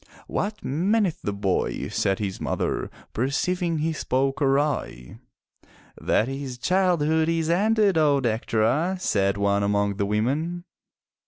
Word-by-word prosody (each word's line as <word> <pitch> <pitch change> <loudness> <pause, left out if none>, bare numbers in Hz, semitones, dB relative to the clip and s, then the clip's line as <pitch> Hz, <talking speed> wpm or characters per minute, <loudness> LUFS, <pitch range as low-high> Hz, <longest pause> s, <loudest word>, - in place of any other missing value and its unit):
"What 210 +1 -3
meaneth 185 - +1
the 105 - -2
boy?" 100 -2 -1
said 95 -1 0
his 100 -3 -4
mother, - - -2 0.2
perceiving 170 - 0
he 160 +2 0
spoke 135 -1 -1
awry. 135 - -1 0.8
"That 110 - +1
his 135 -2 -5
childhood 160 0 +2
is 165 -1 0
ended, 205 -1 +3
O 145 -2 +4
Dectera," 120 +8 0
said 100 - +1
one 100 0 +1
among 100 0 0
the 100 -1 0
women. 145 +12 -1
140 Hz, 120 wpm, -24 LUFS, 105-170 Hz, 0.8 s, O